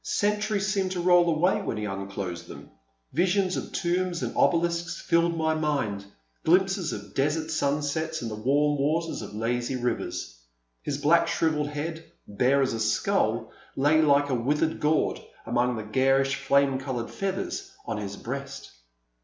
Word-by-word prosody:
Centuries 210 0 0
seemed 195 -3 0
to 180 - -3
roll 175 0 +5
away 165 +3 +2
when 115 - -3
he 105 - -3
unclosed 95 -3 -5
them, - - -11 0.4
visions 185 +2 +2
of - - -5
tombs 175 0 -1
and - - -3
obelisks 170 0 +1
filled 170 -1 +2
my 160 0 +1
mind 140 -11 -1 0.2
— - - -44
glimpses 190 0 +2
of 105 0 -7
desert 155 +3 0
sunsets 155 +2 -1
and 115 - -4
the - - -4
warm 145 +6 +1
waters 160 +4 0
of - - -8
lazy 120 +3 -1
rivers. 120 - -3 0.4
His 145 -2 -3
black 165 +4 +4
shrivelled 155 -3 +1
head, 160 +2 -4 0.2
bare 130 +7 +2
as 130 - 0
a 115 - -3
skull, 110 0 +1 0.2
lay 145 +4 +4
like 145 -1 +4
a - - 0
withered 145 +6 0
gourd 150 +1 +1 0.2
among 120 +2 +1
the 110 - -4
garish 135 +5 +2
flame 140 -1 +2
coloured 130 -3 -4
feathers 195 0 -3 0.2
on 110 -2 -3
his 100 -1 -5
breast. 140 +2 -6
145 Hz, 160 wpm, -27 LUFS, 125-170 Hz, 0.4 s, roll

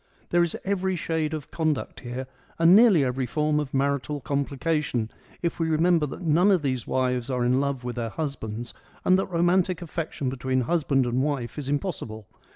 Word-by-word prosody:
There 175 - +3
is 170 -1 +1
every 190 -1 0
shade 160 -2 -1
of 155 -3 -6
conduct 155 -4 -1
here 125 +1 -5 0.3
and 165 +2 +7
nearly 210 -9 +6
every 125 0 -1
form 150 +5 +1
of 145 -3 -3
marital 140 +1 0
complication, 140 -3 -1 0.3
if 170 - -1
we 165 -1 +1
remember 160 0 +3
that 160 - -8
none 170 +4 +4
of 185 -6 +3
these 130 -4 -1
wives 125 -1 0
are 125 -2 0
in 125 +2 +3
love 140 -3 -2
with 125 0 -5
their 115 -1 -2
husbands 120 -6 -5 0.3
and 185 +1 +5
that - - -1
romantic 180 0 +2
affection 160 -4 -4
between 130 0 0
husband 135 -1 +1
and 120 +1 0
wife 140 -3 -2
is 140 -2 -5
impossible. 140 - -3
145 Hz, 180 wpm, -26 LUFS, 130-165 Hz, 0.3 s, and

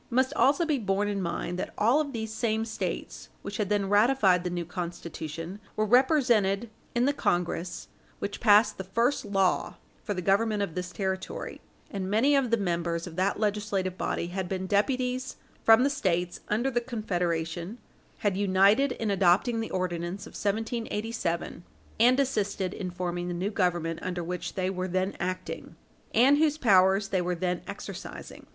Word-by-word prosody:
It 235 - -5
must 260 +2 +3
also 290 +2 +3
be 300 -4 +1
borne 200 -1 0
in 200 -1 -1
mind 175 0 -3
that - - -5
all 240 +8 +4
of 290 -2 -4
these 220 -3 -4
same 220 -1 0
States 225 - -5
which 200 0 -5
had 210 -3 -1
then 205 -2 +1
ratified 205 -3 +4
the 180 - -2
new 175 -1 -3
Constitution 170 0 -6 0.2
were 215 - +1
represented 235 -4 +3 0.2
in 240 +1 +3
the 285 - +2
Congress 175 -5 -1 0.3
which 200 - -4
passed 210 -1 +5
the - - -2
first 230 +8 0
law 195 -2 +1 0.3
for 205 - -2
the 180 - -2
government 205 +2 +2
of 195 - -4
this 180 +1 -4
territory, 190 -1 -4 0.3
and 190 -2 -3
many 245 +8 +3
of 270 -3 +2
the 230 - +3
members 170 -3 -1
of 170 -3 -9
that 190 +2 +1
legislative 205 -3 -1
body 170 - -2
had 185 0 -3
been 190 -1 -2
deputies 250 +5 0 0.3
from 225 +2 +7
the 280 - +3
States 175 -7 -1
under 235 +6 0
the 240 -1 +1
Confederation 175 -5 -2 0.5
had 200 -2 +2
united 200 +7 +4
in 220 -2 -2
adopting 200 +5 +3
the 225 - -3
Ordinance 180 +1 -3
of - - -11
1787 220 -4 -2 0.4
and 250 +4 +5
assisted 205 -8 0
in 185 - -4
forming 175 -1 -3
the 175 - -3
new 190 +4 -2
Government 175 -4 0
under 180 -1 -3
which 180 +1 -4
they 185 -1 0
were 185 -1 -3
then 185 +2 -1
acting, 185 +1 -4 0.4
and 275 +5 +5
whose 305 -1 +3
powers 195 -5 +4
they 185 -2 +1
were 180 0 -1
then 180 0 -1
exercising. 200 - -8
200 Hz, 170 wpm, -28 LUFS, 180-225 Hz, 0.5 s, from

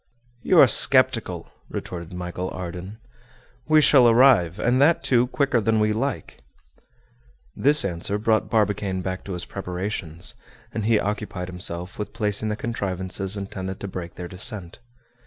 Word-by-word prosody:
"You 185 - +2
are - - +10
sceptical," 120 -8 +4 0.2
retorted 85 -2 -7
Michel 90 0 -5
Ardan. 90 +3 -7 0.7
"We 155 0 +5
shall 130 -5 +6
arrive, 115 -8 +4
and 125 +2 +2
that, 160 +4 +3
too, 125 -1 +2
quicker 135 -2 0
than 110 +1 +1
we 105 0 +2
like." 135 +3 -4 1.1
This 145 -1 +3
answer 95 +2 -2
brought 110 +1 0
Barbicane 105 -4 0
back 95 0 -4
to 100 - -5
his 90 0 -5
preparations, 90 -3 -4 0.4
and 110 -2 -3
he 110 -1 +3
occupied 100 -3 -4
himself 90 +1 -5
with 105 -1 -5
placing 105 -1 -1
the 105 - -1
contrivances 95 -3 -3
intended 95 -1 -6
to 100 - -6
break 85 -3 -7
their 90 - -7
descent. 95 +1 -5
100 Hz, 145 wpm, -23 LUFS, 90-115 Hz, 1.1 s, are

